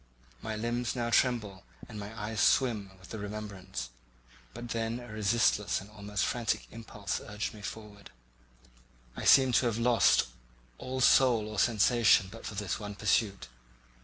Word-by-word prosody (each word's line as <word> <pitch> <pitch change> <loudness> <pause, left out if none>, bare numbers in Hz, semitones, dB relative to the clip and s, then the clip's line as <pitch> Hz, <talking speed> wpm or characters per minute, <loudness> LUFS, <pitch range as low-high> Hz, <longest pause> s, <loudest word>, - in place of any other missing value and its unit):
My 110 - -4
limbs 120 +3 -2
now 120 -1 -2
tremble, 110 -5 +1 0.2
and 105 - -8
my 105 +2 -8
eyes 105 0 -4
swim 110 -7 +2
with 95 -1 -16
the 110 - -6
remembrance; 100 - -6 0.6
but 120 - -8
then 115 +1 -2
a 120 -1 -11
resistless 105 -2 +1
and 100 +2 -13
almost 105 -2 -3
frantic 120 -3 -1
impulse 110 -2 -5
urged 105 +1 -4
me 105 - -12
forward; 105 0 -9 1.1
I - - -6
seemed 130 -2 +6
to 125 - +1
have 115 -2 -1
lost 120 0 +4 0.5
all 130 0 -4
soul 125 -4 +5
or 110 -2 -4
sensation 115 -3 +4
but 115 - -9
for 105 - -7
this 100 -5 -3
one 105 -1 -7
pursuit. 100 - 0
110 Hz, 155 wpm, -30 LUFS, 100-115 Hz, 1.1 s, seemed